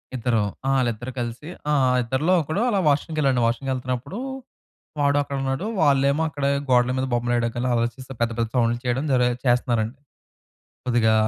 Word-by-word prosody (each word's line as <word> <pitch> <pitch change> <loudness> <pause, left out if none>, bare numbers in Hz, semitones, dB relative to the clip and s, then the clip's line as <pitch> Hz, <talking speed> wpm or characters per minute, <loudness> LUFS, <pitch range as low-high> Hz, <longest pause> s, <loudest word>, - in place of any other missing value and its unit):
ఇద్దరు. 115 -2 +1 0.3
ఆ! - - +2
వాళ్ళిద్దరూ 120 -1 -1
కలిసి 120 +6 -5 0.2
ఆ! - - +3 0.3
ఇద్దరిలో 130 +9 +1
ఒకడు 160 +7 -2
అలా 205 -4 +1
వాష్‌‌రూమ్‌కెళ్ళాడండి. 145 -3 +1
వాష్‌‌రూమ్‌కెళ్తన్నప్పుడు, 130 - -2 0.8
వాడు 140 0 +3
అక్కడ 140 -1 -4
ఉన్నాడు. 135 +7 -2 0.2
వాళ్ళేమో 140 0 +3
అక్కడ 140 -1 -4 0.2
గోడల 125 0 +4
మీద 130 - 0
బొమ్మలు 120 0 0
వేయడానికి 120 -1 0
అలా 125 - 0
ఆలోచిస్తా, 120 +3 -3
పెద్ద 115 0 +2
పెద్ద 115 - 0
సౌండ్‌లు 120 -1 +2
చేయడం 125 +3 0
జర 125 -1 +3 0.2
చేస్తున్నారండి. 120 0 +1 0.9
కొద్దిగా 115 -3 +3
125 Hz, 150 wpm, -23 LUFS, 120-140 Hz, 0.9 s, గోడల